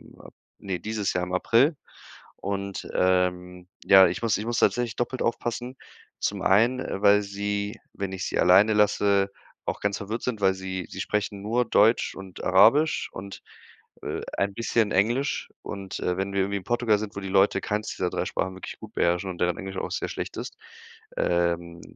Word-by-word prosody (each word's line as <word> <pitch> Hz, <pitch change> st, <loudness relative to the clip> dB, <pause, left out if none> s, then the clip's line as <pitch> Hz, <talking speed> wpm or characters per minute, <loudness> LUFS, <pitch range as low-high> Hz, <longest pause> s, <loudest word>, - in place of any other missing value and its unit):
mal -, -, -14 dB, 0.3 s
ne, 95 Hz, -3 st, -4 dB
dieses 105 Hz, +1 st, -2 dB
Jahr 90 Hz, -, 0 dB
im 90 Hz, 0 st, -5 dB
April. 120 Hz, -, +3 dB, 0.6 s
Und, 100 Hz, 0 st, -4 dB
ähm, 90 Hz, -1 st, 0 dB, 0.2 s
ja, 95 Hz, -1 st, +8 dB
ich 85 Hz, -, -3 dB
muss 110 Hz, -4 st, +2 dB
ich 105 Hz, -, -5 dB
muss 120 Hz, 0 st, -1 dB
tatsächlich 120 Hz, -2 st, +1 dB
doppelt 125 Hz, +1 st, -3 dB
aufpassen. 120 Hz, +2 st, -2 dB, 0.4 s
Zum -, -, -2 dB
einen, 115 Hz, +6 st, +4 dB
äh, 100 Hz, -6 st, -4 dB
weil 105 Hz, 0 st, +6 dB
sie, 100 Hz, +1 st, -3 dB, 0.2 s
wenn 100 Hz, -2 st, -4 dB
ich 95 Hz, -1 st, -4 dB
sie -, -, -2 dB
alleine 100 Hz, +5 st, +6 dB
lasse, 100 Hz, -1 st, +3 dB, 0.3 s
auch -, -, -3 dB
ganz 100 Hz, -1 st, 0 dB
verwirrt 110 Hz, +3 st, -5 dB
sind, 115 Hz, -5 st, -3 dB
weil 95 Hz, -1 st, +4 dB
sie 95 Hz, -1 st, -5 dB
sie -, -, -6 dB
sprechen 100 Hz, -1 st, -2 dB
nur 115 Hz, +4 st, 0 dB
Deutsch 110 Hz, +1 st, +3 dB
und 95 Hz, -2 st, -10 dB
Arabisch 115 Hz, -, +4 dB
und, 100 Hz, +1 st, -8 dB, 0.6 s
äh, -, -, -3 dB, 0.2 s
ein 100 Hz, 0 st, 0 dB
bisschen 115 Hz, 0 st, 0 dB
Englisch. 120 Hz, +9 st, +1 dB
Und, 100 Hz, -1 st, -6 dB
äh, 90 Hz, 0 st, -1 dB
wenn 95 Hz, +1 st, -2 dB
wir 100 Hz, -, +1 dB
irgendwie 100 Hz, +1 st, -1 dB
in 95 Hz, -, -7 dB
Portugal 120 Hz, -3 st, +2 dB
sind, 105 Hz, -1 st, -6 dB
wo -, -, -4 dB
die 95 Hz, -, -5 dB
Leute 100 Hz, +1 st, +3 dB
keins 105 Hz, +1 st, -2 dB
dieser 90 Hz, -, -2 dB
3 -, -, -2 dB
Sprachen 95 Hz, 0 st, -2 dB
wirklich 95 Hz, -, -9 dB
gut -, -, -11 dB
beherrschen 90 Hz, +2 st, +1 dB
und 85 Hz, -, -10 dB
deren 90 Hz, -1 st, +1 dB
Englisch 95 Hz, 0 st, -6 dB
auch -, -, -3 dB
sehr -, -, -2 dB
schlecht -, -, -5 dB
ist, -, -, -6 dB, 0.6 s
ähm, 85 Hz, -1 st, 0 dB
100 Hz, 190 wpm, -26 LUFS, 95-110 Hz, 0.6 s, ja